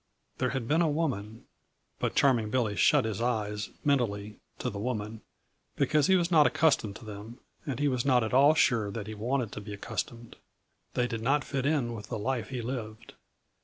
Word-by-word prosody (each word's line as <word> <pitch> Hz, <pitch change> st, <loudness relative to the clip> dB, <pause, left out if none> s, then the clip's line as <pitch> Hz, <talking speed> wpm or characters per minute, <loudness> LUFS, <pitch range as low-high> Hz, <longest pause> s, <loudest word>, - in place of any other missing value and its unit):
There 130 Hz, -, +1 dB
had 130 Hz, -4 st, -3 dB
been 155 Hz, +5 st, +3 dB
a 165 Hz, -, +3 dB
woman 125 Hz, -9 st, -2 dB, 0.5 s
but -, -, -1 dB
Charming 120 Hz, -6 st, +3 dB
Billy 110 Hz, -3 st, 0 dB
shut 140 Hz, +1 st, +4 dB
his 110 Hz, -1 st, -3 dB
eyes, 105 Hz, -4 st, -1 dB, 0.2 s
mentally, 105 Hz, -7 st, 0 dB, 0.2 s
to 125 Hz, -, -3 dB
the 100 Hz, -, -6 dB
woman, 110 Hz, -1 st, -3 dB, 0.5 s
because 150 Hz, -2 st, +2 dB
he 190 Hz, -, +5 dB
was 175 Hz, -1 st, +1 dB
not 155 Hz, -3 st, +6 dB
accustomed 135 Hz, -10 st, +2 dB
to 115 Hz, -, -11 dB
them 105 Hz, +3 st, -9 dB, 0.3 s
and 135 Hz, -4 st, -2 dB
he 145 Hz, -, +2 dB
was 125 Hz, -3 st, 0 dB
not 125 Hz, -3 st, +3 dB
at 110 Hz, -, -3 dB
all 140 Hz, +4 st, +6 dB
sure 115 Hz, -9 st, +3 dB
that 105 Hz, 0 st, -5 dB
he 110 Hz, -, -6 dB
wanted 120 Hz, +1 st, -1 dB
to 105 Hz, -, -6 dB
be 105 Hz, 0 st, -7 dB
accustomed; 115 Hz, +3 st, -5 dB, 0.6 s
they 125 Hz, -, +2 dB
did 115 Hz, -2 st, -4 dB
not 140 Hz, +4 st, +2 dB
fit 135 Hz, 0 st, -2 dB
in 140 Hz, -6 st, +1 dB
with 105 Hz, -2 st, -8 dB
the -, -, -4 dB
life 120 Hz, +2 st, -2 dB
he 125 Hz, -3 st, -4 dB
lived. 115 Hz, -3 st, -6 dB
120 Hz, 200 wpm, -29 LUFS, 110-135 Hz, 0.6 s, not